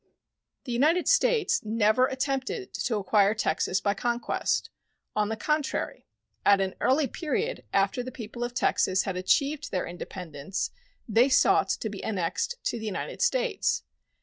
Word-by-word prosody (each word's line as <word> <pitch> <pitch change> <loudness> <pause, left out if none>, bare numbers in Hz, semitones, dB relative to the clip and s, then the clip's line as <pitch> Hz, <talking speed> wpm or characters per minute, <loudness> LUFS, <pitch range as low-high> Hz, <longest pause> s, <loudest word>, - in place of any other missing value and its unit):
The 250 - -6
United 310 +9 +2
States 485 -5 +3
never 220 +3 +3
attempted 270 - -3
to 230 - -1
acquire 205 +1 +3
Texas 185 -1 0
by 200 - +1
conquest. 235 +3 -1 0.4
On 210 0 +1
the 220 - -1
contrary, 300 +5 -2 0.4
at 200 -1 +5
an 190 -1 -1
early 285 +3 +3
period 410 - -2
after 195 +5 +2
the 255 +1 -6
people 235 0 -6
of 240 0 -4
Texas 190 -4 +2
had 195 - -3
achieved 280 +11 +1
their 185 - -1
independence 175 -1 -5 0.4
they 230 +4 +4
sought 255 - +4
to - - -1
be 205 -2 -7
annexed 200 - -1
to 235 - -1
the 220 - -6
United 205 - -4
States. - - +1
235 Hz, 150 wpm, -27 LUFS, 200-280 Hz, 0.4 s, at